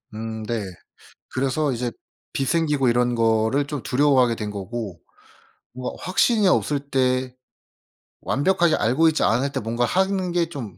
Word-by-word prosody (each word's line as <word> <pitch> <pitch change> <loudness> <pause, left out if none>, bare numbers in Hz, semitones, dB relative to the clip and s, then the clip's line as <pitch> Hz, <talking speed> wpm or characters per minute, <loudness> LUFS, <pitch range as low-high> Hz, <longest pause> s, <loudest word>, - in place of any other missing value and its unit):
음 110 0 -5
네. 115 -1 -2 0.7
그래서 135 +2 0
이제 120 0 -2 0.4
빚 135 - -1
생기고 150 -6 +1
이런 120 0 +2
거를 115 +4 +2
좀 145 -3 -5
두려워하게 130 -3 +3
된 105 -2 -4
거고 100 -2 -6 0.7
뭔가 125 +1 -6
확신이 205 +3 +2
없을 150 -5 +1
때 130 -1 +1 0.9
완벽하게 170 +3 +2
알고 130 +9 +2
있지 155 - 0
않을 130 +5 +1
때 135 - -1
뭔가 115 +2 -1
하는 190 +2 0
게 175 -1 +1
좀 120 - -7
130 Hz, 275 characters per minute, -23 LUFS, 115-150 Hz, 0.9 s, 두려워하게